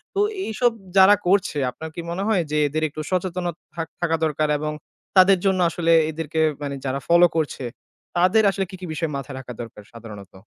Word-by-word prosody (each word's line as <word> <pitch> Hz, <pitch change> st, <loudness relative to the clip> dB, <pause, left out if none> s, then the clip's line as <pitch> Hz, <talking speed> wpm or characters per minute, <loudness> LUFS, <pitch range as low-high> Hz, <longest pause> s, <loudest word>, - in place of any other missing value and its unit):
তো -, -, 0 dB, 0.3 s
এইসব 240 Hz, +2 st, +1 dB, 0.3 s
যারা 190 Hz, +2 st, +8 dB
করছে, 190 Hz, -5 st, +2 dB
আপনার 160 Hz, +4 st, -8 dB
কি 170 Hz, -, -4 dB
মনে 190 Hz, +3 st, -3 dB
হয় 195 Hz, -6 st, +2 dB
যে 150 Hz, -, +1 dB
এদের 155 Hz, +2 st, -2 dB
একটু 155 Hz, +1 st, -6 dB
সচেতনতা 180 Hz, -2 st, -1 dB, 0.2 s
থাক 165 Hz, -1 st, -3 dB
থাকা 165 Hz, -1 st, +1 dB
দরকার 155 Hz, 0 st, 0 dB
এবং 150 Hz, 0 st, -3 dB, 0.5 s
তাদের 190 Hz, 0 st, +4 dB
জন্য 190 Hz, -1 st, +2 dB
আসলে 165 Hz, 0 st, 0 dB, 0.2 s
এদেরকে, 160 Hz, 0 st, -2 dB, 0.2 s
মানে 140 Hz, -1 st, -3 dB
যারা 135 Hz, +1 st, -1 dB
ফলো 175 Hz, +1 st, +6 dB
করছে 150 Hz, -4 st, -2 dB, 0.5 s
তাদের 185 Hz, +5 st, +4 dB
আসলে 195 Hz, 0 st, -2 dB
কি, 190 Hz, -, -8 dB
কি -, -, -5 dB
বিষয় 160 Hz, 0 st, -2 dB
মাথায় 135 Hz, 0 st, -7 dB
রাখা 125 Hz, -2 st, -8 dB
দরকার 115 Hz, -2 st, -10 dB
সাধারণত? 105 Hz, -4 st, -11 dB
165 Hz, 190 wpm, -23 LUFS, 150-185 Hz, 0.5 s, যারা